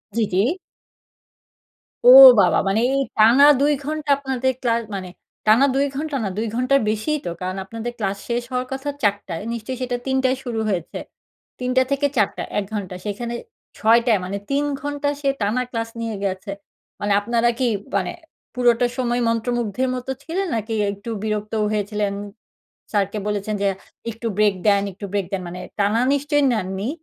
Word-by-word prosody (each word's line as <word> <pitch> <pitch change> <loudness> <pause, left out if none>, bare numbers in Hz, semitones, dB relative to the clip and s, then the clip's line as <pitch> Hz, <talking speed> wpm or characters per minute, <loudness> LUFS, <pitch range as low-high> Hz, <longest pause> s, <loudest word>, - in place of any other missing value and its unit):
জি, 230 - +2
জি। 185 - +4 1.7
ও - - +11 0.3
বাবা। 180 - +3
মানে 200 +3 +2
এই 275 - +2 0.2
টানা 235 +6 +7 0.2
২ 295 +1 +4
ঘণ্টা 305 0 -4
আপনাদের 260 -2 -1
ক্লা 235 -2 +2 0.2
মানে 185 -2 -5 0.4
টানা 230 +6 +6
২ 275 +1 +3
ঘন্টা 300 0 -3
না, 195 - -1
২ 225 - -1
ঘন্টার 255 +3 +3
বেশিই 220 +9 -1
তো। - - -2
কারণ 185 +1 -3
আপনাদের 230 +4 -5
ক্লাস 200 -3 -2
শেষ 240 0 0
হওয়ার 250 0 -2
কথা 270 +2 -3
৪ 205 -1 +4
টায়। 170 +2 -5
নিশ্চয়ই 235 +3 -5
সেটা 245 -1 -1
৩ 265 0 0
টায় 260 0 +2
শুরু 235 -3 -3
হয়েছে। 180 -5 -3 0.6
৩ 250 - -2
টা 260 - +7
থেকে 280 +1 +2
৪ 210 - +4
টা - - -3
১ 205 - 0
ঘন্টা। 190 -3 -4
সেইখানে 235 +3 -4 0.4
৬ 230 +1 +5
টায় 225 -5 +3
মানে 200 +2 -3
৩ 280 +1 +1 0.2
ঘন্টা 290 0 -2
সে 275 - +1
টানা 210 +5 +1
ক্লাস 230 -2 -3
নিয়ে 225 -2 -3
গেছে। 195 +1 -3 0.5
মানে 205 - -1
আপনারা 235 +2 +1
কি, 255 - +2 0.3
মানে 190 -2 0 0.4
পুরোটা 245 -1 +3
সময় 245 -1 0
মন্ত্রমুগ্ধের 240 +1 -1
মত 250 0 -6 0.2
ছিলেন? 370 +5 -2
নাকি 225 0 -3 0.2
একটু 200 +3 -9
বিরক্তও 215 0 -1
হয়েছিলেন? 210 -1 -1 0.8
স্যারকে 205 0 0
বলেছেন 210 0 -2
যে 200 - +2 0.4
একটু 230 +1 -5
ব্রেক 210 -1 +4
দেন, 200 -1 +5
একটু 195 +2 -8
ব্রেক 200 -2 -1
দেন, 195 - -1
মানে 180 +1 -7 0.2
টানা 210 +4 +2
নিশ্চয়ই 290 +1 +1
নেননি? 195 0 -2
230 Hz, 175 wpm, -21 LUFS, 205-255 Hz, 1.7 s, ও